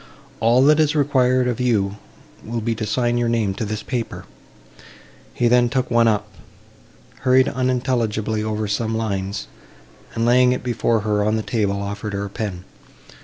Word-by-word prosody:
All 120 +3 +4
that 150 +2 +5
is 155 -1 +2
required 130 -3 +2
of 120 -1 -2
you 105 -5 0 0.5
will 115 +1 -4
be 115 +1 -1
to 110 -1 -4
sign 120 0 0
your 120 -1 +1
name 110 -4 0
to 110 - -4
this 110 0 -4
paper:" 120 -4 -4 1.1
he 120 - 0
then 120 0 +4
took 130 0 -1
one 120 -1 +4
up, 105 -2 +1 0.9
hurried 130 0 +4
unintelligibly 120 -4 -1
over 110 0 -2
some 110 +2 -1
lines, 100 -2 -3 0.7
and, 115 - 0
laying 125 +1 +4
it - - -5
before 115 -2 0
her 105 -1 0
on 110 +1 +1
the 110 - -2
table, 100 -4 -1
offered 100 +1 -5
her 100 0 -2
a - - -6
pen. 100 -5 -5
115 Hz, 170 wpm, -21 LUFS, 105-125 Hz, 1.1 s, that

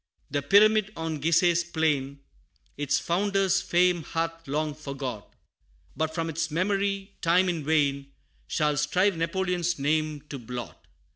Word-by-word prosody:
The 145 0 0
pyramid 210 +6 +4
on 160 -2 -3
Giseh's 170 +2 +3
plain, 145 -5 -1 0.5
Its 145 -1 0
founder's 195 +1 +1
fame 180 -1 +2
hath 165 0 -4
long 150 +2 -1
forgot 135 -7 -6 0.6
But 160 0 -2
from 165 -1 -1
its 165 +1 -2
memory, 195 +3 -1
time, 180 +2 +3
in 170 -4 -1
vain 140 -2 +1 0.4
Shall 150 - 0
strive 180 +7 +2
Napoleon's 175 0 -1
name 155 +1 0
to 140 - -6
blot. 120 0 -8
165 Hz, 130 wpm, -27 LUFS, 145-180 Hz, 0.6 s, pyramid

